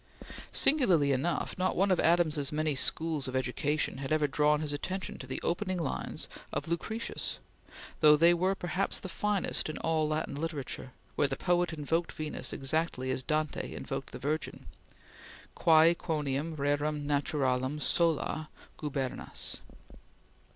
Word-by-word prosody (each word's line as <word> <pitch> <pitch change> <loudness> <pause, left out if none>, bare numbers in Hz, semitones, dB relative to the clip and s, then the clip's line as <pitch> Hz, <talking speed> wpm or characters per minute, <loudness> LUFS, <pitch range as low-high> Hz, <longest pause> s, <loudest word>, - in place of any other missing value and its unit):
Singularly 185 - +4
enough, 140 +7 -1
not 185 - +1
one 195 +2 +3
of 185 - +3
Adams's 160 -4 +3
many 155 0 0
schools 155 +1 +1
of 130 - -4
education 130 +2 0
had 135 +1 -5
ever 155 -1 +3
drawn 150 +2 +2
his 150 -2 -1
attention 185 +6 -4
to 130 - -7
the 130 - -3
opening 185 +2 0
lines 160 -6 -3 0.2
of - - -3
Lucretius, 220 +7 -2 0.6
though 150 -1 +7
they 170 +3 +6
were 185 +3 +1
perhaps 185 +1 -1
the - - -6
finest 200 -1 -1
in 155 - -4
all 160 -1 +1
Latin 155 -1 -1
literature, 145 -4 -4 0.2
where 145 - +3
the 135 -1 -3
poet 175 -1 +2
invoked 160 +2 -1
Venus 155 -1 -4
exactly 135 -2 -1
as 130 - -1
Dante 155 +2 -2
invoked - - -5
the - - -6
Virgin: 155 +3 -3 0.9
"Quae 160 0 +6
quondam 155 -1 -2
rerum 145 +1 0
naturam 140 -2 0
sola 155 -1 +1 0.3
gubernas." 135 -4 -3
155 Hz, 140 wpm, -31 LUFS, 145-170 Hz, 0.9 s, though